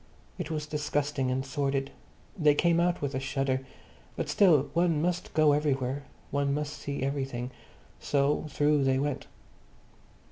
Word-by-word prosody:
It - - -3
was 155 -2 -2
disgusting 145 -2 -1
and 130 +1 -1
sordid. 135 0 -1 0.4
They 155 -6 +4
came 170 +2 +3
out 175 -2 +1
with 140 -1 -1
a 130 - -1
shudder. 135 -1 -1 0.5
But - - -3
still 160 -9 +4
one 170 -2 +2
must 175 +2 -1
go 155 -1 +5
everywhere; 140 -2 0 0.3
one 140 0 +1
must 150 0 -3
see 140 -2 -4
everything. 135 -3 -2 0.5
So 145 +2 +1
through 145 0 +2
they 135 0 +3
went. 140 0 -2
145 Hz, 145 wpm, -29 LUFS, 135-150 Hz, 0.5 s, go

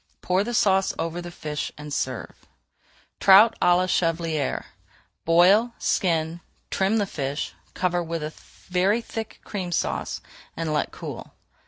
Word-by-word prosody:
Pour 185 +2 +1
the 240 +2 -3
sauce 195 -3 +3
over 165 +1 -3
the 175 - -7
fish 150 -3 -4
and 150 -1 -7
serve. 130 -4 -4 0.7
TROUT 205 +4 +8
À 175 0 +5
LA 185 - +2
CHEVALIÈRE 165 -4 0 0.6
Boil, 195 +8 +5
skin, 165 -2 0 0.3
trim 195 +3 +2
the 205 - +2
fish, 140 -5 -3 0.2
cover 180 -1 +1
with 160 -2 -4 0.3
very 190 +4 +2
thick 225 -1 -6
Cream 185 -4 -4
Sauce - - -1 0.4
and 165 -2 -1
let 150 - 0
cool. - - -8
175 Hz, 135 wpm, -25 LUFS, 160-195 Hz, 0.7 s, TROUT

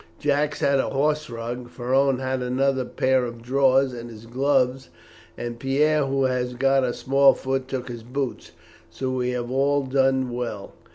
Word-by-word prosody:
Jacques 145 0 0
had 140 0 +2
the - - 0
horse 150 +2 0
rug, 120 +1 -6
Ferron 130 +2 +1
had 130 0 -2
another 130 +1 0
pair 130 +1 +1
of 120 -1 -5
drawers 135 +1 +3
and 120 -1 -7
his 110 -1 -12
gloves, 130 +1 0 0.5
and 120 -1 -5
Pierre, 145 +3 +2
who 135 0 0
has 125 -1 -1
got 135 +1 +3
a 125 - +1
small 135 +2 +4
foot, 135 0 -2
took 130 -2 -4
his 120 -2 -7
boots. 130 +3 -4 0.4
So 130 -1 -4
we 125 -1 -1
have 125 -1 -3
all 140 +2 +2
done 130 -1 +1
well." 120 -5 -5
130 Hz, 170 wpm, -24 LUFS, 125-135 Hz, 0.5 s, small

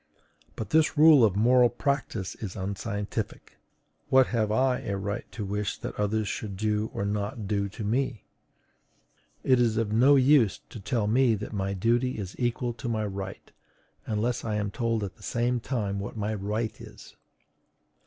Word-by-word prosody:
But 110 -2 -6
this 160 -1 +3
rule 150 -4 +8
of 105 -4 +3
moral 120 +3 +5
practice 120 - -2
is 100 -5 -7
unscientific: 100 +1 -4 0.5
what 130 0 +6
have 110 -3 +1
I 130 +3 +2
a 100 - -3
right 100 +1 -4
to 105 - -4
wish 105 +1 -2
that - - -6
others 105 +1 -1
should 100 -2 -4
do 105 +1 0
or 100 - -3
not 105 +1 -3
do 100 -1 0
to 110 - -7
me? 115 +2 -1 1.2
It 130 -1 +4
is 115 -2 +2
of 115 -2 0
no 130 +6 +6
use 135 -5 +4
to 115 - -9
tell 105 +2 -1
me 120 +2 +3
that 105 +2 -6
my 100 -1 -2
duty 120 +6 +1
is 95 -3 -6
equal 120 0 -1
to 120 - -3
my 110 -2 -1
right, 100 -1 -6 0.6
unless 115 +3 -1
I 110 -2 -2
am 105 -1 -1
told 115 -2 -1
at 95 - -6
the - - -20
same 120 +1 0
time 105 -5 -2
what 100 +3 -6
my 105 +1 -1
right 105 +2 -3
is. - - -13
110 Hz, 175 wpm, -27 LUFS, 100-120 Hz, 1.2 s, rule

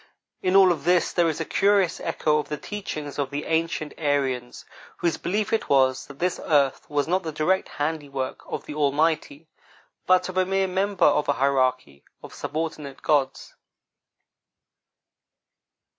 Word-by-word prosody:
In 185 +1 +1
all 190 -2 +7
of 155 -5 -2
this 175 +1 +2
there 170 -2 +3
is 155 - -3
a - - -2
curious 200 -3 +2
echo 150 -1 0
of 150 - -5
the 150 - -3
teachings 155 -9 -6
of 140 -2 -1
the 145 +1 -4
ancient 160 -2 -1
Aryans, 135 -5 -1 0.3
whose 170 -3 0
belief 205 +4 -2
it 225 - 0
was 130 -1 +3
that 145 - -12
this 180 +3 -1
earth 140 -3 +1
was 145 -1 0
not 185 +3 +1
the 160 -3 -5
direct 170 +5 0
handiwork 145 -3 -3
of - - -5
the - - -7
Almighty, 150 +1 0 0.6
but 185 0 +4
of 185 0 -6
a 185 - +4
mere 195 0 +1
member 190 -1 +1
of 145 0 +3
a - - +4
hierarchy 130 - 0 0.2
of - - -10
subordinate 155 -3 -5
gods. 135 -3 0
150 Hz, 160 wpm, -24 LUFS, 140-180 Hz, 0.6 s, all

